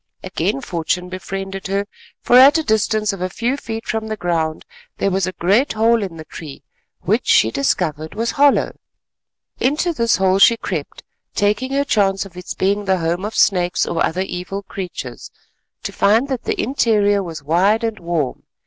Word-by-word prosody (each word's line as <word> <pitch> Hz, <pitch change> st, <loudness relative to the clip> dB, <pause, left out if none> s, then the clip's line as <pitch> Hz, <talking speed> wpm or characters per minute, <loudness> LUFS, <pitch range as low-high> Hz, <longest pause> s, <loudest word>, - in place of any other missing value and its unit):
Again 135 Hz, -, -2 dB
fortune 180 Hz, +1 st, -2 dB
befriended 195 Hz, +1 st, -5 dB
her, 200 Hz, +1 st, -1 dB, 0.4 s
for 245 Hz, -, +3 dB
at 275 Hz, +5 st, +8 dB
a 320 Hz, -, -1 dB
distance 215 Hz, -3 st, +1 dB
of 195 Hz, -, -7 dB
a 185 Hz, -, -1 dB
few 240 Hz, +7 st, -1 dB
feet 225 Hz, -5 st, -6 dB
from 220 Hz, 0 st, -2 dB
the 215 Hz, 0 st, -4 dB
ground 165 Hz, -4 st, -2 dB, 0.3 s
there 195 Hz, -, 0 dB
was 190 Hz, 0 st, 0 dB
a -, -, -2 dB
great 200 Hz, -, +2 dB
hole 225 Hz, +1 st, +3 dB
in 185 Hz, -5 st, -5 dB
the 160 Hz, -, -9 dB
tree 155 Hz, -3 st, -10 dB, 0.4 s
which, -, -, 0 dB
she 110 Hz, -, +4 dB
discovered, 155 Hz, +3 st, -1 dB
was 230 Hz, +1 st, -1 dB
hollow. 285 Hz, 0 st, +3 dB, 0.8 s
Into 305 Hz, +6 st, +1 dB
this 235 Hz, -5 st, +2 dB
hole 190 Hz, 0 st, +2 dB
she 230 Hz, +3 st, +6 dB
crept, -, -, -5 dB, 0.3 s
taking 210 Hz, +6 st, 0 dB
her 280 Hz, +1 st, +1 dB
chance 195 Hz, -5 st, +1 dB
of 185 Hz, -3 st, -14 dB
its 180 Hz, 0 st, -7 dB
being 200 Hz, +2 st, 0 dB
the 190 Hz, -1 st, +2 dB
home 170 Hz, +2 st, -1 dB
of 210 Hz, +2 st, -4 dB
snakes 180 Hz, -3 st, +2 dB
or 170 Hz, -, -1 dB
other 180 Hz, +3 st, -1 dB
evil 190 Hz, +1 st, -5 dB
creatures, 175 Hz, -11 st, -7 dB, 0.5 s
to -, -, -4 dB
find 225 Hz, +7 st, +2 dB
that 260 Hz, -3 st, -3 dB
the -, -, -2 dB
interior 210 Hz, -5 st, +2 dB
was 165 Hz, -5 st, -7 dB
wide 190 Hz, +9 st, +2 dB
and 225 Hz, -2 st, -2 dB
warm. 170 Hz, -6 st, -2 dB
195 Hz, 180 wpm, -19 LUFS, 175-225 Hz, 0.8 s, at